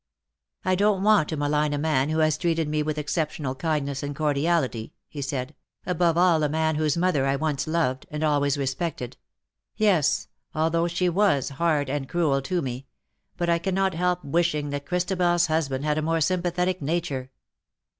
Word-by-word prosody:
" 65 -2 -41
I 185 0 +3
don^t 200 +1 +2
want 210 -7 +4
to 160 - -3
malign 150 +1 +1
a - - 0
man 145 -2 +1
who 155 - 0
has 155 -1 +3
treated 165 -1 0
me 150 0 0
with 155 0 -2
exceptional 150 -2 -2
kindness 140 -1 -2
and 145 0 -4
cordiality 145 -5 0
,^^ - - -26 0.2
he 145 - -7
said, 135 0 -3 0.2
" - - -42
above 170 -2 +1
all 175 -3 +4
a 150 - +1
man 160 +1 +1
whose 155 0 0
mother 170 -6 +2
I 135 - +2
once 150 0 -1
loved, 155 -5 -1
and 150 +1 -4
always 145 -2 +2
respected 135 -1 -3 0.3
— - - -66 0.2
yes, 190 -9 +2 0.3
although 165 +2 +1
she 175 +1 0
was 175 -6 +2
hard 145 0 0
and 135 0 -3
cruel 155 -6 +1
to 175 +4 -1
me 130 +1 -5 0.2
— - - -47
but 175 - -1
I 170 0 +2
cannot 190 +1 0
help 180 +1 0
wishing 150 -1 0
that 145 0 -5
ChristabeFs 175 -1 +1
husband 145 -3 -1
had 150 0 +1
a - - -1
more 165 +1 0
sympathetic 180 +2 0
nature. 140 -4 -2
155 Hz, 190 wpm, -25 LUFS, 145-175 Hz, 0.3 s, want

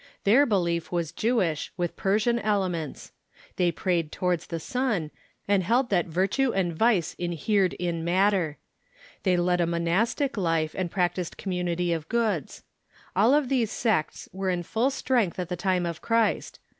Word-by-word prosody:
Their 255 +8 +5
belief 170 -5 0
was 170 -3 -1
Jewish, 185 -6 0
with 175 -2 -2
Persian 215 +5 +1
elements. 185 -8 -2 0.5
They 175 -1 +3
prayed 170 -2 -1
towards 180 -2 -1
the 165 - -4
sun, 215 -7 -1 0.4
and 200 -1 +3
held 235 +7 +1
that 180 -3 +2
virtue 195 +10 +1
and 175 -5 -1
vice 205 -4 +2
inhered 180 +3 +1
in 170 -2 -3
matter. 180 -3 +2 0.6
They 180 -1 +2
led 180 0 +2
a 170 - +1
mo 170 0 -1
nastic 220 - 0
life, 165 -4 0
and 185 -2 -2
practised 175 -1 -1
community 180 -2 -1
of 160 -1 -5
goods. 220 - -1 0.5
All 220 +9 +5
of 295 -3 +2
these 245 -5 +1
sects 210 -11 -1
were 190 0 -2
in 175 -1 -1
full 225 +9 +1
strength 250 -8 0
at 180 -2 -4
the 180 - -2
time 185 0 0
of 170 -2 -4
Christ. 230 -1 0
180 Hz, 160 wpm, -26 LUFS, 170-220 Hz, 0.6 s, Their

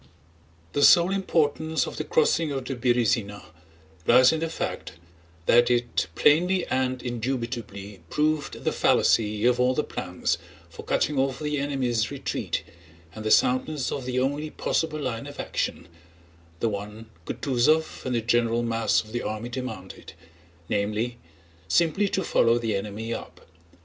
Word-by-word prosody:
The 145 - 0
sole 170 +5 +7
importance 160 -4 +1
of - - -7
the - - -2
crossing 445 - +2
of 135 -2 -3
the 135 - -3
Berëzina 115 -4 0 0.6
lies 125 +1 +7
in 160 - -1
the 165 0 -2
fact 165 - -4 0.5
that 120 +1 +5
it 120 -6 +1
plainly 180 +4 +3
and 130 -1 -1
indubitably 115 -5 -4
proved 150 0 -1
the - - +1
fallacy 105 0 +2
of 125 0 +3
all 125 +1 +3
the 150 - +1
plans 90 -1 -2 0.3
for - - -9
cutting 145 -2 0
off 135 -1 0
the 150 0 -2
enemy's 130 -6 0
retreat - - -3 0.5
and 110 - -8
the 110 - -1
soundness 130 +4 +2
of 135 - -4
the 125 0 -1
only 145 +4 -1
possible 155 0 -1
line 125 -5 -4
of - - -10
action—the 85 +2 -6
one 105 +1 -5 0.2
Kutúzov 150 +4 +1
and 130 -1 -2
the 115 - +1
general 120 0 +1
mass 115 -1 +1
of 110 - -15
the 120 +1 -2
army 110 +3 -4
demanded—namely, 95 0 -5 0.5
simply 175 - +2
to 190 - -1
follow 115 -7 +3
the 115 -3 -1
enemy 105 +3 -4
up. - - -8
120 Hz, 145 wpm, -26 LUFS, 110-145 Hz, 0.6 s, sole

